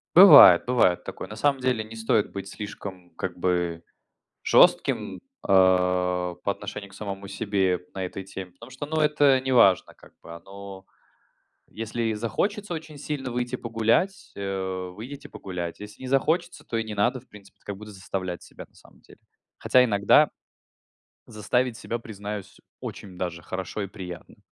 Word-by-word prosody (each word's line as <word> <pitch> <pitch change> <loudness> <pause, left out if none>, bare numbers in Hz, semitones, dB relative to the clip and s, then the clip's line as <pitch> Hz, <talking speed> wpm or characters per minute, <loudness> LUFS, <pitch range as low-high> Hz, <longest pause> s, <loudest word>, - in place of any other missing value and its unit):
Бывает, 150 - +10
бывает 120 -8 +2
такое. - - -7
На 105 - -9
самом 135 +3 +1
деле 125 -4 0
не 110 +1 -11
стоит 110 -1 +1
быть 95 0 -6
слишком, 100 -4 -8
как - - -5
бы, 85 -2 -1 0.6
жестким, - - +3
э, - - -14 0.3
по 90 -1 +3
отношению 100 0 -4
к - - -18
самому 100 -1 -6
себе 95 -3 -1
на 95 - -4
этой 95 +1 -5
теме, 95 -1 -8
потому 115 +7 -14
что, 130 +3 -6
ну, 160 +2 -3
это 145 -3 +4
не 130 0 -3
важно, 95 -7 +4
как - - -19
бы 85 - -11
оно. 95 +2 -11 0.9
Если 115 +2 -4
и 110 -1 0
захочется 195 - -2
очень 155 -2 -7
сильно 140 -3 -4
выйти 125 +1 -2
погулять- 115 - 0
э, 95 -2 -4
выйдите 125 +10 -9
погулять, 90 -3 -6
если 105 +2 -11
не 130 - -6
захочется, 135 +6 0
то 115 - -3
и 115 - 0
не 110 -1 -6
надо, 100 +6 +1
в 125 - -23
принципе, 100 -1 -17 0.3
заставлять 95 -3 -5
себя. - - -11 0.9
Хотя 125 0 +4
иногда 100 -4 +4 1.0
заставить 125 +3 -1
себя, 115 - -4
признаюсь, 105 -3 -7 0.2
очень 95 -3 -8
даже 85 -2 -4
хорошо 95 +2 -5
и 100 - -3
приятно 90 -4 -9
105 Hz, 150 wpm, -25 LUFS, 95-125 Hz, 1.0 s, Бывает